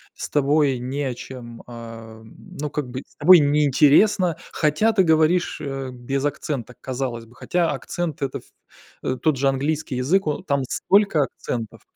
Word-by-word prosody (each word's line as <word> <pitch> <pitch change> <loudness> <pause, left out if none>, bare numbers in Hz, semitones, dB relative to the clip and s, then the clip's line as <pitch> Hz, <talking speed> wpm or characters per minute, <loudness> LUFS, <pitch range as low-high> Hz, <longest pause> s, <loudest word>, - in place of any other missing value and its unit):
с - - -6
тобой 145 -2 +2
не 135 +4 -3
о 130 - -2
чем, 120 -1 -10
а, 115 -2 -10
ну 150 - -8
как 145 -5 -3
бы, 130 +2 -6
с - - -28
тобой 185 0 +8
не 145 +1 +3
интересно, 165 +6 +4 0.2
хотя 155 +9 +2
ты 190 -3 +4
говоришь, 160 +2 +2
э, 135 -2 -4
без 135 +3 -3
акцента, 140 -4 -3
казалось 125 -3 -4
бы. 115 +2 -20
Хотя 175 +4 0
акцент- 155 +3 -4
это, 135 - -3
в - - -21 0.6
э, 130 - -1
тот 155 -4 +2
же 135 - +1
английский 140 0 -1
язык, 165 +10 +1
о 150 +2 -2
там 140 -6 -1
столько 195 -3 +2
акцентов 115 -3 -6
140 Hz, 170 wpm, -22 LUFS, 125-155 Hz, 0.6 s, тобой